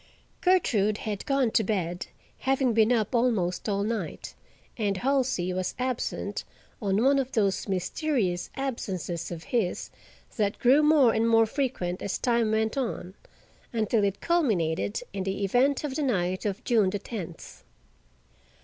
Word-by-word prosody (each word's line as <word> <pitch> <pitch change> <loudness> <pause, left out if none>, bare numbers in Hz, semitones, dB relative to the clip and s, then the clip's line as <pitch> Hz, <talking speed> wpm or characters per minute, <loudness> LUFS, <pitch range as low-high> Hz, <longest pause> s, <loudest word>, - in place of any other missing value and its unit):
Gertrude 220 - +3
had 210 -3 -5
gone 275 -4 +2
to 220 - +3
bed, 180 -4 -2 0.3
having 265 -2 +1
been 220 +1 +4
up 225 -1 +1
almost 220 -6 +1
all 200 0 0
night, 225 +1 -4 0.4
and 205 -4 -1
Halsey 255 -7 0
was 185 0 -2
absent 255 -1 -2 0.4
on 200 +1 +1
one 275 +1 +4
of 265 -1 -3
those 200 -4 +1
mysterious 195 - -1
absences 190 - -3
of 170 -1 -6
his 235 -10 -1 0.5
that 205 -2 0
grew 265 +5 +5
more 300 -6 +5
and 225 +1 +2
more 225 0 +5
frequent 220 -8 -2
as 200 - -2
time 235 -3 +1
went 220 0 +1
on, 225 -7 -3 0.6
until 220 -1 +1
it 200 -1 -1
culminated 215 - +1
in 195 -1 -2
the 195 +1 -2
event 255 +9 +2
of 290 -3 -3
the 305 - -2
night 185 -7 0
of 205 +4 -4
June 220 -6 +3
the 205 - -2
tenth. 195 -5 -8
220 Hz, 150 wpm, -27 LUFS, 190-255 Hz, 0.6 s, grew